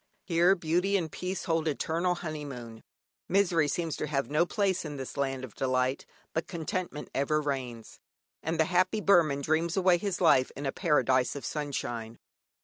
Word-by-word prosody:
Here 175 +2 +4
Beauty 180 +3 +1
and 165 -5 -3
Peace 185 +1 -4
hold 165 -1 0
eternal 165 +4 0
honeymoon. 140 -9 -7 0.5
Misery 175 -5 +3
seems 165 +1 -1
to - - -2
have 140 -1 -1
no 155 +4 +3
place 195 -2 0
in 150 -3 -6
this 130 -1 -6
land 135 -2 -1
of 125 -5 -8
delight, 130 0 0 0.3
but 160 - -2
contentment 170 -1 -4
ever 145 +3 +1
reigns, 130 -6 -4 0.4
and 160 +1 -2
the 160 - +5
happy 185 +5 +2
Burman 170 -9 +4
dreams 160 +5 0
away 185 -2 +4
his 195 -1 -2
life 130 -7 +4
in 140 - -5
a 135 - 0
paradise 135 -7 +2
of 140 - -6
sunshine. 120 -6 -4
155 Hz, 165 wpm, -29 LUFS, 135-175 Hz, 0.5 s, the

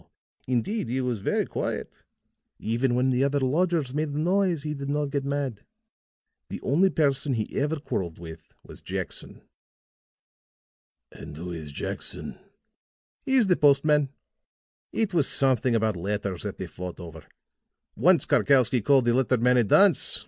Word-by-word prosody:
Indeed, 125 - -1
he 130 +2 -1
was 125 -4 -2
very - - 0
quiet. - - -5 0.5
Even 120 +3 0
when 130 +1 +2
the 125 +1 +2
other 140 +1 +1
lodgers 150 0 0
made 150 +1 -1
a 145 - -5
noise 180 -2 +1
he 150 -1 -3
did 140 -1 -6
not 145 -1 -1
get 140 -1 -1
mad. 140 -5 -3 0.9
The - - -5
only 175 +9 +3
person 140 -4 +1
he 110 -2 -4
ever 150 +3 0
quarreled 95 - -4
with 80 -1 -12
was - - -13
Jackson." - - -6 1.7
"And 75 - -10
who 90 +2 -6
is 80 -3 -7
Jackson?" 70 - -5 0.8
"He 265 - -1
is 250 -4 +5
the 185 -2 +3
postman. 145 -1 +3 0.8
It 215 -4 -1
was 160 -6 +2
something 130 -3 +2
about 110 -2 +1
letters 100 0 -3
that - - -6
they - - -5
fought 90 0 -8
over. 80 -3 -10 0.7
Once 175 -5 +4
Karkowsky 130 -3 +3
called 135 -1 +4
the 120 - +3
letter 130 0 +2
man 125 +2 +3
a 120 - +4
dunce. 185 - +4
135 Hz, 155 wpm, -26 LUFS, 115-150 Hz, 1.7 s, is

